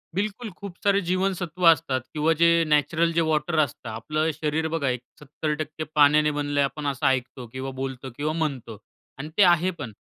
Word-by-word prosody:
बिलकुल. 215 +3 -2
खूप 200 -3 -9
सारे 200 -1 +3
जीवनसत्व 185 -1 -2
असतात 160 -5 +4
किंवा 155 +1 +2
जे 170 - +6 0.2
नॅचरल 155 +3 +2
जे 165 - +2
वॉटर 155 +1 +1
असतं. 130 -5 -1
आपलं 155 +8 -2
शरीर 155 +1 -1
बघा 140 -5 0
एक 125 -1 -2 0.2
70% 155 +2 -4
पाण्याने 150 +1 +5
बनलय 145 -1 -1
आपण 145 +1 -2
असं 140 0 -2
ऐकतो 130 -1 -1
किंवा 135 +1 -4
बोलतो 130 0 -5
किंवा 150 +2 -1
म्हणतो. 135 -9 -3 0.4
आणि 150 +3 -6
ते 205 - +7
आहे 175 0 +4
पण. 125 -7 -5
150 Hz, 175 wpm, -25 LUFS, 140-170 Hz, 0.4 s, ते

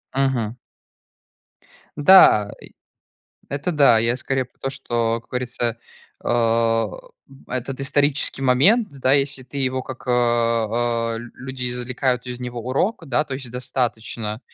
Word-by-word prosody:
Мгм. 125 -4 0 1.4
Да, 145 - +7
и - - -14 0.8
Это 145 +6 -2
да. 140 -7 +5
Я 115 +2 +1
скорее 130 0 -2
про - - -34
то, 135 - -2
что, 115 -4 -1
как - - -33
говорится, 125 -2 -2 0.5
а, 115 -1 +2 0.6
этот 130 +2 -3
исторический 145 0 +1
момент, 190 - +4
да, 130 +1 +4
если 135 -1 +1
ты 130 +3 -9
его 130 -1 -1
как, 130 0 -9
а, 115 -1 +1
люди 125 +2 -6
извлекают 125 +1 -2
из 125 0 -6
него 120 -1 -5
урок, 150 - -1
да, 135 +4 +1
то 135 - -6
есть 130 -2 -7
достаточно, 115 -3 -3
125 Hz, 130 wpm, -22 LUFS, 115-135 Hz, 1.4 s, Да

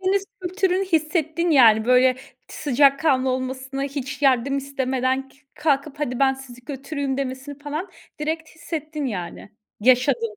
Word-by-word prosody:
Akdeniz 385 +1 +1 0.2
kültürünü 370 +1 0
hissettin, 325 0 0
yani. 225 -7 +6
Böyle 255 +1 +5
t 265 - -16
sıcakkanlı 275 -1 +3
olmasını, 260 +1 -3
hiç 275 -1 -5
yardım 275 0 +3
istemeden 265 -1 -1
kü 275 - -24 0.2
kalkıp 300 -1 0
hadi 250 -4 -2
ben 270 -1 +3
sizi 250 -2 -12
götüreyim 275 -1 -3
demesini 270 +1 -5
falan 305 +6 -5 0.3
direkt 315 +1 -2
hissettin, 310 -2 -5
yani. 180 -3 -6 0.3
Yaşadın. 245 -2 +3
275 Hz, 135 wpm, -23 LUFS, 260-310 Hz, 0.3 s, yani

